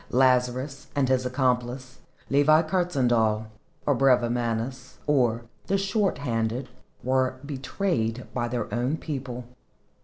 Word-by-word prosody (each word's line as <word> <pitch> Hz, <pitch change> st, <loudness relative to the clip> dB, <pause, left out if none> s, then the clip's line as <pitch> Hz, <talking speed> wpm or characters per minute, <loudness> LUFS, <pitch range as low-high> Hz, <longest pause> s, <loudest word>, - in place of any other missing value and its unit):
Lazarus 130 Hz, +2 st, +2 dB
and 140 Hz, -2 st, +2 dB
his 130 Hz, -1 st, +2 dB
accomplice 125 Hz, 0 st, -1 dB, 0.3 s
Levi 155 Hz, +3 st, +5 dB
Kurtzhandel, 125 Hz, -, +1 dB, 0.4 s
or 145 Hz, -, +4 dB
Brevimanus, 120 Hz, -1 st, +1 dB
or 120 Hz, -5 st, +2 dB, 0.2 s
"the 195 Hz, -, +2 dB
short 195 Hz, 0 st, +1 dB
handed," 120 Hz, -1 st, -2 dB, 0.3 s
were 130 Hz, 0 st, +1 dB
betrayed 130 Hz, -, -2 dB
by 120 Hz, -1 st, -1 dB
their 120 Hz, -2 st, -3 dB
own 125 Hz, +6 st, 0 dB
people. 130 Hz, -6 st, -5 dB
130 Hz, 110 wpm, -26 LUFS, 120-140 Hz, 0.4 s, Levi